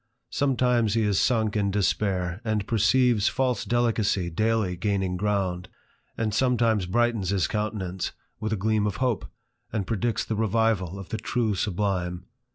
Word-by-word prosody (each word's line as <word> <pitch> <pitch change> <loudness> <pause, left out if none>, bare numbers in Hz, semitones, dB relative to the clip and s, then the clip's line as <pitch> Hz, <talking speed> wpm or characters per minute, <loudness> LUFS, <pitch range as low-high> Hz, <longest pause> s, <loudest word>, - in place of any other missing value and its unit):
Some 135 -3 +1
times 120 -4 +2
he 115 - +2
is 105 -2 +2
sunk 110 -4 +1
in 100 -2 +1
despair, 95 -2 0
and 110 -3 -1
perceives 115 0 +3
false 130 -2 0
delicacy 110 -7 +1
daily 110 0 +1
gaining 95 -1 -1
ground, 95 -2 -1 0.5
and 110 -2 -1
sometimes 115 -5 +2
brightens 115 -1 +1
his 95 -4 +1
countenance 100 -4 -3 0.3
with 110 -1 -3
a - - +2
gleam 105 +1 +1
of 100 - -2
hope, 125 -4 -1 0.4
and 105 -3 -2
predicts 115 +1 -1
the 110 - -2
revival 110 -4 +1
of 95 -2 -9
the 110 - -2
true 115 -4 0
sublime. 95 -2 -1
105 Hz, 155 wpm, -26 LUFS, 95-115 Hz, 0.5 s, perceives